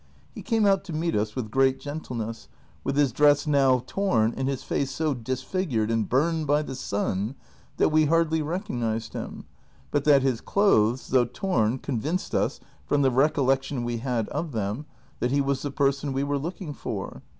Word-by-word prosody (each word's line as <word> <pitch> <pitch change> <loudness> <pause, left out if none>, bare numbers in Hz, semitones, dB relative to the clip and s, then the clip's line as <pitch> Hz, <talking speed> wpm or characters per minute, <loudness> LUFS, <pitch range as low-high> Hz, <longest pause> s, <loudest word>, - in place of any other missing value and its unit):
He - - -8
came 225 -3 +1
out 195 -1 +3
to 175 - -6
meet 165 +2 -1
us 105 0 0
Avith 115 -5 -4
great 135 +1 +3
gentleness, 120 -7 -5 0.4
wdth 135 - -1
his 145 -3 +3
dress 145 +3 +4
noAV 135 -4 +3
torn 120 - +1
and 135 - -2
his 135 -2 -2
face 140 - -1
so 155 0 -1
disfigured 130 - -2
and 115 -3 0
burned 155 +4 +1
by 145 +2 +3
the 135 - -6
sun, 105 -1 -2 0.4
that - - +3
Ave 155 0 +4
hardly 160 0 +2
recognized 120 - -3
him - - -6 0.5
but 145 - +1
that 140 -3 +6
his 130 -4 0
clothes, 130 - +2
though 125 -2 +4
torn, 120 - 0
con 125 -3 -3
vinced 170 +8 -2
us, - - 0 0.2
from 145 -1 +1
the 135 - +4
recollection 135 -1 +1
Ave 120 0 -2
had 115 -2 -1
of 165 -4 -3
them, 110 +7 -3 0.3
that 125 - 0
he 140 +2 +2
Avas 140 -1 0
the 145 - -2
person 140 +1 0
Ave 135 +1 -1
were 140 0 -1
looking 170 +1 -5
for. - - -5
135 Hz, 185 wpm, -26 LUFS, 120-150 Hz, 0.5 s, that